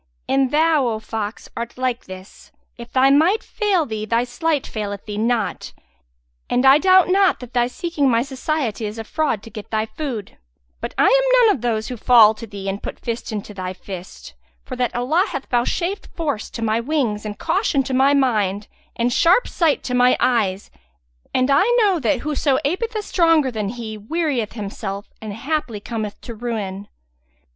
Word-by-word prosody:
And 270 -1 +2
out, 315 -1 +3
O 225 -2 -1
fox, 215 0 -5
art 235 +1 -5
like 255 -2 -2
this: 185 +1 -12 0.2
if 235 0 -11
thy 265 +1 +4
might 345 +11 +3
fail 395 -7 0
thee, 220 -4 -4
thy 230 +2 +1
sleight 285 +4 -1
faileth 205 -2 -5
thee 210 -1 -5
not; 230 -1 -1 0.8
and 250 +2 +2
I 270 +2 +8
doubt 370 +1 +5
not 385 0 +3
that 250 -1 -11
thy 240 -1 +2
seeking 290 +1 -1
my 230 -1 +2
society 265 -5 -2
is 210 +2 -7
a 225 - -4
fraud 255 -4 -1
to 225 - -11
get 210 0 -9
thy 220 0 0
food; 235 -5 -6 0.4
but - - -6
I - - +4
am - - +5
none 425 - +5
of 255 - -9
those 220 -3 -1
who 250 - -5
fall 225 -2 +6
to 225 +1 -10
thee 200 -2 -7
and 195 +1 -3
put - - -7
fist 230 0 -4
into 210 -1 -5
thy 185 -1 -5
fist;[FN#170] 185 -1 -11
for 260 - -5
that 250 -1 -1
Allah 300 +10 +2
hath 275 - -5
vouchsafed 345 +11 -1
force 290 -10 -2
to 230 - -6
my 220 +1 +1
wings 235 -5 -1
and 210 -1 -6
caution 330 -5 +1
to 260 - -4
my 270 +2 +4
mind 210 -7 +1 0.3
and 240 +1 0
sharp 355 - +4
sight 325 -4 +1
to 250 - -4
my 250 0 +4
eyes; 205 -6 0 0.6
and 255 +2 +1
I 280 +7 +5 0.2
know 385 -5 +3
that 265 -1 0
whoso 295 -2 +1
apeth 440 +10 -1
a 425 - -2
stronger 330 -8 +3
than 215 -3 -3
he, 220 -2 -6
wearieth 265 -2 -2
himself 200 -1 -6
and 215 -1 -6
haply 245 0 -3
cometh 215 -1 -5
to 235 - -7
ruin. 210 -4 -4
245 Hz, 185 wpm, -21 LUFS, 215-300 Hz, 0.8 s, I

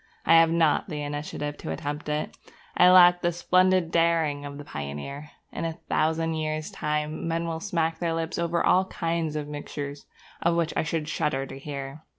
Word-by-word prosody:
I - - +5
have 165 0 +5
not 165 +1 +2
the 150 -3 -4
initiative 145 0 -4
to - - -6
attempt 145 - -4
it. 150 0 -2 0.4
I 180 - +7
lack 175 -1 +7
the 175 - +1
splendid 180 0 +2
daring 165 -4 +2
of 140 0 -7
the 145 - -8
pioneer. 75 - -6 0.2
In - - -5
a 165 -1 -2
thousand 160 0 0
years' 155 -1 -3
time 150 +1 -2
men 165 0 -1
will 165 -1 -3
smack 165 -4 -1
their 170 -2 -1
lips 165 +1 -3
over 170 0 0
all 185 +1 +4
kinds 165 -3 -2
of 150 -1 -3
mixtures 145 -1 -6 0.3
of 170 0 +2
which 170 -1 0
I - - +2
should 160 -1 -2
shudder 150 -3 -1
to 135 0 -9
hear. 140 0 -6
160 Hz, 185 wpm, -26 LUFS, 145-170 Hz, 0.4 s, I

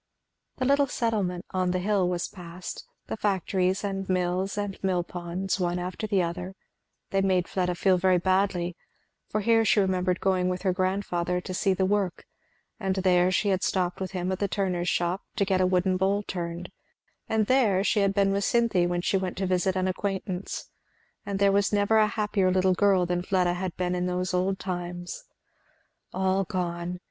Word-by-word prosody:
The 255 - -1
little 280 +1 +3
settlement 205 -8 -1
on 185 -1 0
"the 180 - +1
hill" 190 -1 +1
was 175 -1 -1
passed, 180 - -8 0.2
the - - -4
factories 190 -2 0
and 195 -1 -3
mills 185 +2 0
and 205 -2 -4
mill 185 -2 +1
ponds, 175 +2 -3
one 175 -1 0
after 180 +4 -4
the 195 -3 +2
other; 180 +2 -4 0.6
they 195 - +2
made 185 -2 +2
Fleda 180 -1 -1
feel 185 +1 +3
very 185 0 +4
badly, 185 -1 +1 0.5
for 215 - -1
here 225 +2 +4
she 215 -1 +3
remembered 185 -2 +1
going 185 -1 +1
with 180 +1 -3
her 190 -2 +2
grandfather 180 -2 -1
to 185 - -6
see 190 +1 +1
the 190 - +1
work, 195 -2 -1 0.5
and 190 -3 -1
there 180 -1 +3
she 190 +2 +1
had 190 -1 +1
stopped 180 -1 -1
with 190 - -2
him 180 0 -2
at 190 - -2
the 200 - +1
turner's 180 -3 -1
shop 175 +2 0
to 200 - +1
get 190 -1 +1
a 185 - +4
wooden 185 0 +2
bowl 195 +2 +1
turned, 175 -2 -5 0.6
and 220 -1 +2
there 215 -7 +3
she 210 - +2
had 195 -1 +2
been 200 -1 +3
with 200 +1 0
Cynthy 225 -6 +2
when 175 0 -1
she 195 - +1
went 185 -1 -3
to 190 - -1
visit 185 +1 +1
an 185 0 0
acquaintance; 190 0 -3 0.6
and 200 -1 -2
there 200 0 +4 0.2
never 205 +1 +2
was 215 - +6
a 210 - -5
happier 210 -3 +1
little 185 0 +3
girl 190 -1 +3
than 175 0 -1
Fleda 180 -1 +1
had 180 0 -4
been 180 0 -1
in 180 0 -1
those 180 +1 -2
old 185 +2 +1
times. 175 -1 -5 0.9
All 190 +1 +1
gone! 180 -2 -3
185 Hz, 190 wpm, -27 LUFS, 180-195 Hz, 0.9 s, was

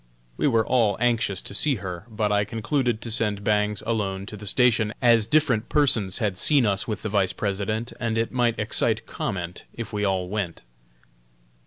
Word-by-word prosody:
We - - +1
were 115 -5 +2
all 110 -6 +2
anxious 115 -5 0
to - - -5
see 140 +7 +3
her, 90 -1 -7
but 105 -1 -1
I 105 0 +3
concluded 115 +2 -1
to 115 - -3
send 105 -2 -1
Bangs 105 -1 +1
alone 100 -4 -2
to 105 - -8
the 105 0 -7
station, 110 0 +3
as 115 -3 +4
different 125 -5 +2
persons 115 -10 +2
had 100 -4 -1
seen 140 0 +4
us 100 -1 0
with 110 -3 -4
the 110 - -2
Vice 95 -3 +1
President, 105 +4 -2
and 115 -1 -1
it 115 0 0
might 120 -2 +1
excite 110 +1 0
comment 90 -5 -5
if 115 -1 -6
we 105 0 -1
all 95 -2 0
went. 95 -4 -4
110 Hz, 185 wpm, -24 LUFS, 100-115 Hz, -, as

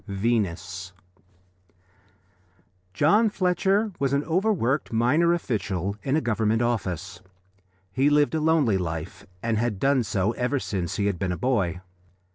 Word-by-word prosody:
VENUS 95 -3 -2 2.0
John 205 - +3
Fletcher 195 +2 +1
was 140 -1 0
an 140 +1 +1
overworked 165 - 0
minor 125 +10 +3
official 100 - -2
in 135 +1 0
a 160 - +2
Government 110 0 +1
office. 95 -6 -3 0.7
He 135 +8 +2
lived 150 0 +3
a 160 - 0
lonely 150 -11 +2
life, 80 -1 -5 0.2
and 115 -2 0
had 115 -4 -1
done 135 +1 +3
so 100 -1 0
ever 125 +4 -1
since 95 -5 -3
he 100 - -1
had 100 -4 -1
been 95 0 -1
a 90 - -3
boy. 95 -9 0
115 Hz, 135 wpm, -25 LUFS, 95-145 Hz, 2.0 s, John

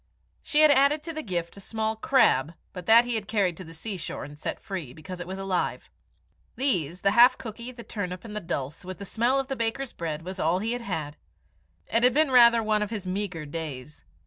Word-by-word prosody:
She 300 - +2
had 310 -1 +8
added 285 +2 +4
to 330 +1 -5
the 310 - -4
gift 175 - -4
a - - -9
small 220 +2 -2
crab, 215 - +3 0.2
but 180 -2 -8
that 230 +2 +7
he 245 - -1
had 215 -3 -2
carried 200 -6 +1
to 185 - -7
the 165 - -12
seashore 190 +1 -5
and 145 +1 -10
set - - -4
free, 170 -10 -6
because 160 +5 -9
it 175 - -6
was 190 +1 -5
alive. 195 -2 -2 0.6
These, 180 - 0
the 195 - +4
half 235 +4 +7
cookie, 235 +2 -7
the 240 -2 -11
turnip, 180 -4 -5
and 210 -2 -8
the - - -1
dulse, 145 -1 -4
with 185 -1 -7
the 200 - -8
smell 240 +7 +1
of 270 - -3
the 270 - -3
baker's 235 +3 -2
bread, 160 -1 -4
was 185 +2 -7
all 165 +2 +2
he 220 +4 -2
had 245 0 -2
had. 155 -9 -4 0.7
It 230 - +2
had 250 +1 +4
been 305 -2 +3
rather 235 -2 +7
one 215 -1 +1
of 210 - -1
his 210 -4 -5
meagre 185 -4 -3
days. 150 -2 -7
200 Hz, 225 wpm, -27 LUFS, 170-235 Hz, 0.7 s, had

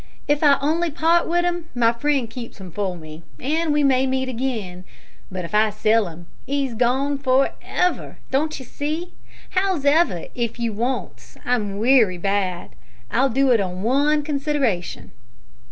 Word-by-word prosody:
If 290 0 +2
I 290 -2 +7
on'y 320 +5 +1
part 330 +3 +2
with 350 +1 +1
'im, 350 -1 -1
my 230 -1 +3
friend 275 0 0
keeps 230 -1 -9
'im 185 -2 -9
for 185 0 -3
me, 155 0 -11 0.2
and 315 +4 0
we 295 0 +2
may 265 -1 +3
meet 260 0 -1
again, 225 -8 -3 0.5
but 185 -2 -4
if 170 - -10
I 215 +1 +4
sell 215 0 +2
'im, 170 +1 -10 0.2
he's 275 -2 -1
gone 265 +5 +1
for 265 0 +3
ever! 360 0 -1
Don't 305 +4 0
you 260 - -9
see? 310 +7 -4 0.4
Hows'ever, 330 - +2
if 235 -1 -3
you 230 -2 -1
wants 240 +5 -4
'im 210 -5 0
wery 225 -5 +4
bad, 190 - -1 0.4
I'll 270 +3 +3
do 265 +2 +2
it 230 -4 +4
on 185 0 -4
one 290 +5 +2
consideration." 280 - -2
260 Hz, 160 wpm, -22 LUFS, 210-290 Hz, 0.5 s, I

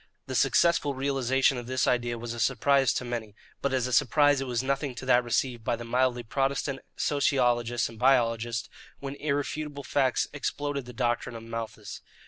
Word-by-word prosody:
The - - -6
successful 170 -5 +3
realization 135 -1 +1
of 120 - -9
this 130 0 0
idea 120 -1 0
was 115 0 -5
a 120 - -7
surprise 135 +2 +3
to 125 - -2
many, 115 -4 -5 0.3
but 140 - 0
as 130 -2 +1
a 125 - -3
surprise 145 +2 +4
it 135 - -3
was 120 0 -1
nothing 140 0 -1
to 130 - -7
that 125 -1 +4
received 120 0 -1
by 115 - 0
the 120 - -8
mildly 125 0 +1
protestant 135 +2 -1 0.2
sociologists 120 -5 +1
and 115 -1 -12
biologists 120 -3 +2 0.3
when 140 0 -5
irrefutable 145 0 -3
facts 130 0 +1
exploded 145 -1 -3
the 125 - -9
doctrine 120 -1 -1
of 115 - -8
Malthus. 115 -1 -6
130 Hz, 175 wpm, -28 LUFS, 120-140 Hz, 0.3 s, surprise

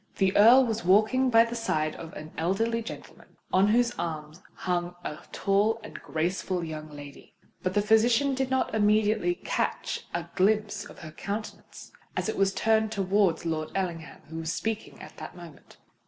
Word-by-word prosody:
The 190 -1 +2
Earl 240 +6 +8
was 225 -2 -2
walking 215 +8 +4
by 230 -1 +7
the 230 - -6
side 155 -10 -1
of 165 -1 -9
an 155 +1 -9
elderly 225 +8 0
gentleman, 225 - -11 0.2
on 190 +2 +5
whose 240 +3 +3
arm 155 -3 -4 0.2
hung 175 -1 -2
a 150 - -5
tall 205 +3 +1
and - - -9
graceful 175 +2 -2
young 155 -1 -6
lady; 145 -1 -12 0.3
but 185 0 -2
the 205 - +3
physician 230 +5 +4
did 265 0 -1
not 260 -4 0
immediately 215 +8 +2
catch - - -3
a - - -3
glimpse 210 +1 +1
of - - -13
her 155 - -8
countenance, 205 +7 -7 0.3
as - - -1
it 220 - -2
was 195 0 +2
turned 220 +2 +2
towards 195 -4 +1
Lord 155 -1 -2
Ellingham, 170 -4 -4
who 160 +1 -8
was 165 0 -2
speaking 220 +4 -4
at - - -12
the - - -7
moment. 170 -3 -14
200 Hz, 170 wpm, -27 LUFS, 165-220 Hz, 0.3 s, Earl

